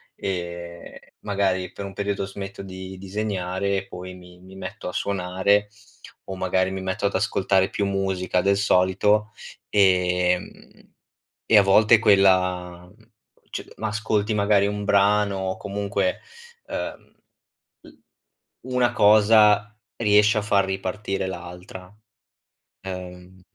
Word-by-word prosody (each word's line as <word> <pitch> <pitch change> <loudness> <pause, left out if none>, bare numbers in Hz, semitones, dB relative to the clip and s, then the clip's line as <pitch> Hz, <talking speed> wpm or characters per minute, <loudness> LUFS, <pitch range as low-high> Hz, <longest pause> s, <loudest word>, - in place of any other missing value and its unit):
e 85 -2 -7
magari 95 -3 -1
per 100 - -7
un 95 - -8
periodo 100 0 -2
smetto 95 0 -8
di 95 0 -9
disegnare 100 -1 -3
e 95 0 -5
poi 90 +1 -9
mi 90 0 -15
mi 95 +1 -15
metto 95 +1 -7
a - - -5
suonare, 100 +2 0 0.6
o 95 - -6
magari 95 0 0
mi 95 0 -5
metto 95 +2 -3
ad 100 - 0
ascoltare 95 -1 +1
più 100 - -2
musica 95 -2 -1
del 100 +1 +2
solito, 105 +3 +2 0.4
ehm, 90 -2 0 0.5
e 110 - +5
a - - +8
volte 105 +3 +5
quella 90 -4 +2 0.6
c - - -6
ma 110 - -3
ascolti 105 0 -1
magari 100 -1 +3
un 105 0 -3
brano 100 0 +2
o 95 0 -3
comunque, 100 - -2 0.5
uhm, - - -6 0.7
l - - -14 0.7
una 125 -1 +1
cosa 105 0 +4 0.2
riesce 105 0 +4
a - - -3
far 100 -1 +2
ripartire 95 0 -3
l'altra. 90 +1 -9 0.9
Ehm 90 0 -9
95 Hz, 120 wpm, -23 LUFS, 95-105 Hz, 0.9 s, a